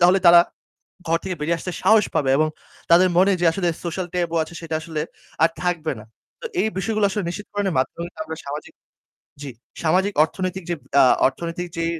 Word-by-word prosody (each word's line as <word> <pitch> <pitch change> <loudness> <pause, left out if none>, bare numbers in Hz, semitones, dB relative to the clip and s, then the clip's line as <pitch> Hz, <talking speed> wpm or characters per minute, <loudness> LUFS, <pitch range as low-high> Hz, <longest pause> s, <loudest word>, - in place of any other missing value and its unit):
তাহলে 180 +2 +5
তারা 170 0 +9 0.7
ঘর 165 +1 +3
থেকে 185 -1 -3
বেরিয়ে 165 +3 0
আসতে 180 - -5
সাহস 220 -1 +6
পাবে 135 -3 +1
এবং 155 +1 +3 0.4
তাদের 175 +2 +7
মনে 190 +2 +5
যে - - +2
আসলে 175 +1 -1 0.2
social 175 +1 -3
taboo 170 -2 0
আছে 160 - -12
সেটা 165 -1 -4
আসলে 160 -1 -4 0.4
আর 165 - +6
থাকবে 170 -3 -1
না। - - -11 0.4
তো - - -7 0.2
এই - - +1
বিষয়গুলো 215 +1 0
আসলে 205 +1 -2
নিশ্চিত 210 +4 -7
করনের 200 -3 -1
মাধ্যমে 130 +6 -1
কিন্তু 175 - -17
আমরা 160 - -5
সামাজিক 145 +2 -7 0.7
জি, 145 - -6 0.3
সামাজিক 185 +5 +2
অর্থনৈতিক 185 +3 -3
যে, 175 - 0 0.3
আ - - +7 0.2
অর্থনৈতিক 170 +5 -5
যে, 165 - 0
175 Hz, 190 wpm, -22 LUFS, 160-190 Hz, 0.7 s, তারা